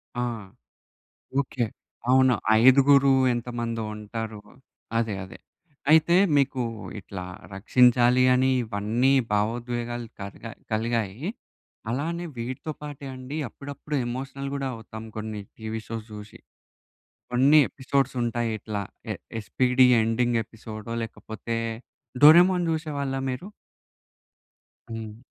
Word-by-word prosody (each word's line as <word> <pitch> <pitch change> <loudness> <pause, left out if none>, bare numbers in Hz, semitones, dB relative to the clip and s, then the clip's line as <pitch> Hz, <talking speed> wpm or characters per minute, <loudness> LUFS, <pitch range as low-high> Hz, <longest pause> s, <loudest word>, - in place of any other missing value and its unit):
ఆ! 120 - -1 1.2
ఓకే. 130 -3 -2 0.5
అవును. 130 -1 +5 0.3
ఐదుగురు 140 +2 +6 0.2
ఎంతమందో 115 -1 -3
ఉంటారు. 110 0 -6 0.6
అదే. 110 -3 0
అదే. 95 - -12 0.5
అయితే 160 +3 +6 0.2
మీకు 135 -2 +2 0.4
ఇట్లా 90 -1 -7 0.3
రక్షించాలి 125 +4 +4
అని 130 +1 +3
ఇవన్నీ 110 +4 0 0.2
భావోద్వేగాలు 120 +2 -1 0.2
కలిగా 100 +3 -8 0.2
కలిగాయి. 110 -1 -1 0.7
అలానే 165 +8 -2
వీటితో 125 +6 -4
పాటే 145 -2 -7
అండి, 130 +3 -7
అప్పుడప్పుడు 145 +4 -6
ఎమోషనల్ 135 +2 -5
కూడా 135 -1 -2
అవుతాం 110 0 -9
కొన్ని 110 -1 -4 0.2
టీవీ 110 0 -5
షోస్ 115 -1 -5
చూసి. 105 0 -10 0.9
కొన్ని 135 +5 +6
ఎపిసోడ్స్ 135 +3 -1
ఉంటాయి 120 -1 -1
ఇట్లా. 105 -1 -4 0.3
ఎ - - -3 0.3
'ఎస్పీడీ' 125 +3 +3 0.2
ఎండింగ్ 120 +1 +1
ఎపిసోడో, 110 0 -9
లేకపోతే 115 +1 -5 0.7
'డోరేమోన్' 175 +3 +7
చూసేవాళ్ళా 140 -4 -2
మీరు? 150 +10 -5 1.4
హ్మ్. 110 -1 -6
120 Hz, 100 wpm, -26 LUFS, 110-135 Hz, 1.4 s, డోరేమోన్